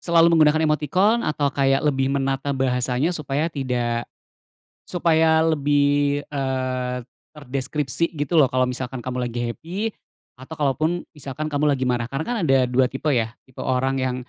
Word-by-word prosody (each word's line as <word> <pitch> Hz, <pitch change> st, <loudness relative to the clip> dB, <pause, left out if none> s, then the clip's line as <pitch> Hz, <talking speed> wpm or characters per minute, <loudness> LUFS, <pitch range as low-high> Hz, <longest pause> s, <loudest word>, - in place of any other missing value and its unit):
selalu 170 Hz, -1 st, +4 dB
menggunakan 155 Hz, 0 st, +4 dB
emotikon 170 Hz, -, +2 dB
atau 145 Hz, -5 st, -1 dB
kayak 135 Hz, +1 st, +2 dB
lebih 135 Hz, -2 st, +1 dB
menata 135 Hz, 0 st, -1 dB
bahasanya 130 Hz, +4 st, 0 dB
supaya 150 Hz, 0 st, -2 dB
tidak 120 Hz, -4 st, -2 dB, 0.8 s
supaya 160 Hz, -2 st, +3 dB
lebih, 145 Hz, -2 st, +2 dB
eee, 130 Hz, -2 st, -2 dB, 0.4 s
terdeskripsi 145 Hz, +2 st, -2 dB
gitu 145 Hz, +3 st, +1 dB
loh 140 Hz, -, +6 dB
kalau 130 Hz, 0 st, +1 dB
misalkan 125 Hz, -1 st, -4 dB
kamu 125 Hz, -1 st, -2 dB
lagi 120 Hz, 0 st, -5 dB
happy, 170 Hz, -, -8 dB, 0.6 s
atau 130 Hz, +5 st, -9 dB
kalaupun 155 Hz, +4 st, 0 dB
misalkan 145 Hz, +2 st, -5 dB
kamu 145 Hz, 0 st, +2 dB
lagi 130 Hz, -, -3 dB
marah, 120 Hz, -2 st, 0 dB
karena 135 Hz, +3 st, -2 dB
kan 245 Hz, -, -1 dB
ada 135 Hz, -1 st, +4 dB
2 130 Hz, 0 st, +3 dB
tipe 135 Hz, +3 st, -4 dB
ya, 115 Hz, -3 st, +1 dB, 0.2 s
tipe 130 Hz, -, -16 dB
orang 130 Hz, +1 st, 0 dB
yang 130 Hz, -1 st, -1 dB
140 Hz, 150 wpm, -23 LUFS, 130-155 Hz, 0.8 s, loh